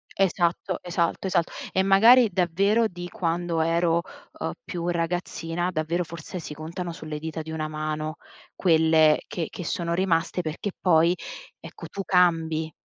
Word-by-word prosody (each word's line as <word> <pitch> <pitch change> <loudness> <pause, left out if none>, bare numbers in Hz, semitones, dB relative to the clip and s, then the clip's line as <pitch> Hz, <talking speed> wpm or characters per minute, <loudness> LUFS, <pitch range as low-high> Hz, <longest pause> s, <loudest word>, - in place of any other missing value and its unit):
esatto, 185 -1 +1
esalto, 170 +1 -1
esatto. 175 -3 +1 0.2
E 190 - +3
magari 225 +5 +7
davvero 195 +6 +2
di 175 -1 -8
quando 170 -1 -1
ero, 165 +1 +2 0.4
uhm, - - -2
più 175 - -4
ragazzina 175 0 -2
davvero 170 +2 -1
forse 170 +2 -7
si 150 - -7
contano 170 +3 -6
sulle 155 -2 -6
dita 160 +1 -5
di 160 0 -8
una 155 -1 -3
mano 155 0 -3 0.4
quelle 160 -3 +4
che 165 -3 -3
che 180 - -7
sono 170 +1 -2
rimaste, 170 -1 +1
perché 165 +5 -4
poi 170 -1 +4 0.5
ecco - - -10
tu 195 - -5
cambi, 165 -3 +2
170 Hz, 145 wpm, -25 LUFS, 160-180 Hz, 0.5 s, magari